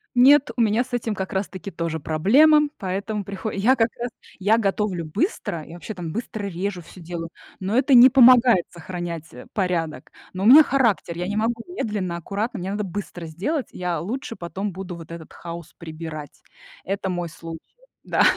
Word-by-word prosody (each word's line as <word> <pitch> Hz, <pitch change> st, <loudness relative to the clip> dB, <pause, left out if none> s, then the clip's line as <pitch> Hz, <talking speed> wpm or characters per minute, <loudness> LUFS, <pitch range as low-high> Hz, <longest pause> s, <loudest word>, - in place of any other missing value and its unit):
Нет, 265 Hz, +2 st, +6 dB
у -, -, -1 dB
меня 225 Hz, +2 st, +3 dB
с 255 Hz, -, -18 dB
этим 230 Hz, -3 st, -1 dB
как 190 Hz, -1 st, -4 dB
раз 190 Hz, +1 st, -1 dB
таки 200 Hz, +1 st, -8 dB
тоже 165 Hz, -3 st, -3 dB
проблема, 275 Hz, -, +5 dB
поэтому 200 Hz, +2 st, -3 dB
прихо 200 Hz, +3 st, -5 dB
я 220 Hz, +7 st, +3 dB
как 225 Hz, -1 st, +2 dB
раз 240 Hz, +1 st, -2 dB, 0.3 s
я 205 Hz, +3 st, +3 dB
готовлю 195 Hz, -4 st, -1 dB
быстро, 170 Hz, -, -2 dB
я 160 Hz, -, -11 dB
вообще 175 Hz, +5 st, -7 dB
там 170 Hz, -4 st, -6 dB
быстро 215 Hz, -1 st, -4 dB
режу 185 Hz, 0 st, -3 dB
всё 180 Hz, -, -14 dB
делаю, 165 Hz, 0 st, -6 dB, 0.3 s
но 195 Hz, +4 st, -1 dB
это 265 Hz, +1 st, +4 dB
не 245 Hz, +1 st, +10 dB
помогает 245 Hz, -6 st, +7 dB
сохранять, 170 Hz, -2 st, -6 dB
э, 125 Hz, -, -11 dB
порядок. 175 Hz, -5 st, -2 dB, 0.2 s
Но 190 Hz, +2 st, -3 dB
у -, -, +2 dB
меня 280 Hz, +7 st, +10 dB
характер, 230 Hz, -, +1 dB
я 175 Hz, +1 st, -3 dB
не 205 Hz, -, -2 dB
могу 230 Hz, +1 st, 0 dB
медленно, 210 Hz, -, -3 dB
аккуратно, 200 Hz, +7 st, -3 dB
мне 185 Hz, +1 st, -4 dB
надо 210 Hz, +1 st, -2 dB
быстро 185 Hz, -2 st, -6 dB
сделать, 215 Hz, -, -2 dB
я 175 Hz, -3 st, -3 dB
лучше 230 Hz, -, -4 dB
потом 190 Hz, +4 st, -4 dB
буду 185 Hz, -1 st, -7 dB
вот 165 Hz, -1 st, -10 dB
этот 165 Hz, -2 st, -9 dB
хаос 170 Hz, -1 st, -9 dB
прибирать. 155 Hz, -2 st, -8 dB, 0.4 s
Это 195 Hz, +1 st, -2 dB
мой 175 Hz, -1 st, -2 dB
случай, 165 Hz, 0 st, -9 dB, 0.4 s
да, -, -, +2 dB
195 Hz, 185 wpm, -23 LUFS, 170-225 Hz, 0.4 s, не